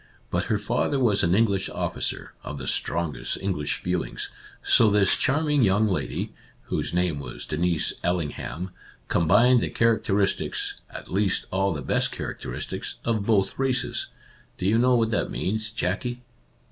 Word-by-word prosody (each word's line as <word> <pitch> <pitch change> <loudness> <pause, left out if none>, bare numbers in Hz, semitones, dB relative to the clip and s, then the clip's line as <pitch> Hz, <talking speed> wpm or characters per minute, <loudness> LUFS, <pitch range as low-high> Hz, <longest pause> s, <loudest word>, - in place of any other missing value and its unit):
But - - 0
her 110 - +1
father 105 +7 0
was 110 -6 +3
an 85 +2 +3
English 100 -3 +2
officer, - - -3
of 75 - -6
the 65 - -6
strongest 85 -2 -1
English 90 -7 -1
feel 90 -1 -1
ings, - - -6 0.3
so 110 - +6
this 100 -2 +4
charming 150 +1 +2
young 105 0 +4
lady 95 -3 -2 0.4
(whose - - -1
name 90 -4 0
was 65 -4 -7
Denise 85 +1 +1
Allingham) 90 +1 -2 0.4
combined 115 +9 +5
the - - -1
characteristics 105 -4 +1
— - - -37
at - - -9
least 100 0 +1
all 95 +1 +1
the 75 -5 -4
best - - +1
character - - -5
istics - - -4
— - - -21
of 110 -3 0
both 100 -1 +2
races. 130 -2 0 0.5
Do 90 - -4
you 110 +4 +4
know 125 +1 +4
what 115 -1 +2
that 105 - 0
means, 110 +3 -2
Jackie 115 +4 -2
100 Hz, 160 wpm, -25 LUFS, 90-115 Hz, 0.5 s, so